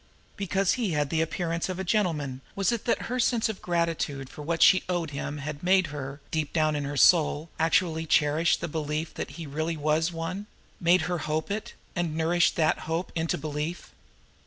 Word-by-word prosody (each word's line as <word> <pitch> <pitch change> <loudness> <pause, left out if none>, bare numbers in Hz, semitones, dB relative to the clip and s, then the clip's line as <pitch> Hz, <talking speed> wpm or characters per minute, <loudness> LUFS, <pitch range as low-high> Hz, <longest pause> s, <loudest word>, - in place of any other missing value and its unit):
Because 195 -1 +1
he 225 -9 -1
had 145 -2 0
the 160 - +2
appearance 170 +1 -2
of 185 - -3
a 190 - -2
gentleman, 160 - 0
was 195 +3 +2
it 235 -3 -2
that 235 - +1
her 250 +2 -2
sense 235 -2 +2
of 215 - -5
gratitude 165 -6 -1
for - - -9
what 165 +3 +2
she 185 - +7
owed 170 -4 -1
him 145 +1 -4
had 145 0 -5
made 185 +1 +4
her, 140 -1 -6
deep 155 -2 -1
down 155 -2 +2
in 145 -1 -2
her 145 0 -4
soul, 160 -1 +4
actually 160 0 +2
cherish 155 +3 +3
the 170 - -4
belief 155 0 -3
that - - -5
he 165 - -6
really 155 +3 -2
was 155 +3 +1
one 170 +5 -4 0.3
made 175 +1 +4
her 175 +1 -1
hope 155 +4 -2
it, 220 +3 -4 0.2
and 170 -3 -1
nourish 170 +2 +3
that 160 -2 +1
hope 165 +3 -3
into 165 0 -1
belief? 155 +3 -4
165 Hz, 195 wpm, -27 LUFS, 150-180 Hz, 0.3 s, she